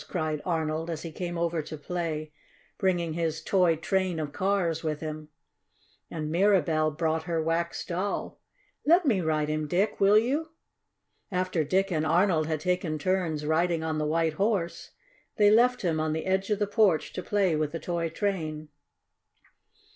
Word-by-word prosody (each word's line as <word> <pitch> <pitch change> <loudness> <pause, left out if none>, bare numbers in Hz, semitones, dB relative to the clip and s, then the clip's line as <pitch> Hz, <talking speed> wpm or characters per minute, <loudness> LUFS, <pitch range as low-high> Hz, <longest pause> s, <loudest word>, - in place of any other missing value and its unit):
cried 155 -4 -2
Arnold, 160 -1 -1
as 160 -2 -4
he 165 - -6
came 175 +1 -4
over 170 -1 0
to 155 +1 -8
play, 155 -1 -4 0.5
bringing 175 -4 +1
his 160 -1 -1
toy 180 -3 +3
train 185 +1 -1
of 150 -2 -3
cars 185 -4 0
with 155 -2 -2
him. 155 -1 -6 0.8
And 155 -2 -4
Mirabell 165 -4 +3
brought 160 -1 0
her 170 -2 -1
wax 165 +1 -1
doll. 185 +4 -3 0.4
"Let 340 +3 +4
me 220 -9 +2
ride 155 -2 0
him, 155 0 -2
Dick, 190 +7 0
will 200 +1 +6
you?" 290 +8 0 0.8
After 185 -3 0
Dick 190 +5 +1
and 155 -3 0
Arnold 165 0 +2
had 155 -2 -2
taken 180 -3 -1
turns 165 -2 -1
riding 165 +1 +1
on 160 -1 -1
the 150 - 0
White 160 0 +1
Horse, 180 -2 -1 0.5
they 205 -1 +6
left 245 +2 +4
him 165 -3 +1
on 155 0 0
the 160 - -3
edge 190 0 0
of 210 - +2
the 205 - +1
porch 205 -5 +2
to - - -4
play 195 -4 +1
with 155 -1 -1
the 165 - -4
toy 170 -1 -2
train. 155 -5 -3
170 Hz, 170 wpm, -28 LUFS, 155-190 Hz, 0.8 s, will